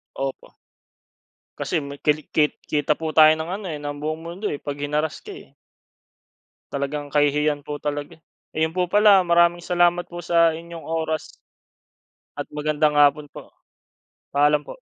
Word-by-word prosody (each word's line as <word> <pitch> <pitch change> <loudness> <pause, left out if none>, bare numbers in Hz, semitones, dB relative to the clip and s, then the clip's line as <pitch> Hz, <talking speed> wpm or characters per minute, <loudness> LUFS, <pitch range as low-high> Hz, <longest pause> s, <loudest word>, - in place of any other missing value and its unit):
Opo. 135 -1 -5 1.1
Kasi - - -2
me 140 - -7
kali 150 0 +3
ke 150 -1 +4 0.2
kita 150 0 +1
po 160 -1 -4
tayo 155 -1 +9
ng 160 +2 -5
ano 205 0 -8
eh 155 - -4
ng 145 0 -6
buong 155 +1 -3
mundo 175 +5 -7
eh - - -3
pag 145 0 -5
hinarass 150 +2 -2
ka - - -13
eh. 395 - -14 1.2
Talagang 140 +1 -3
kahihiyan 145 0 +2
po 145 +1 -6
talaga 145 +1 -5
eh. 160 - -34 0.4
Ayun 160 +1 +1
po 180 -1 -1
pala, 205 -1 +6
maraming 170 0 +3
salamat 175 0 +1
po 175 0 -7
sa 170 -1 +3
inyong 170 0 -9
oras. 160 -1 -2 1.1
At - - -5
magandang 150 0 0
hapon 145 0 +4
po. - - -13 0.8
Paalam 145 +1 +3
po. - - -11
155 Hz, 155 wpm, -23 LUFS, 145-170 Hz, 1.2 s, tayo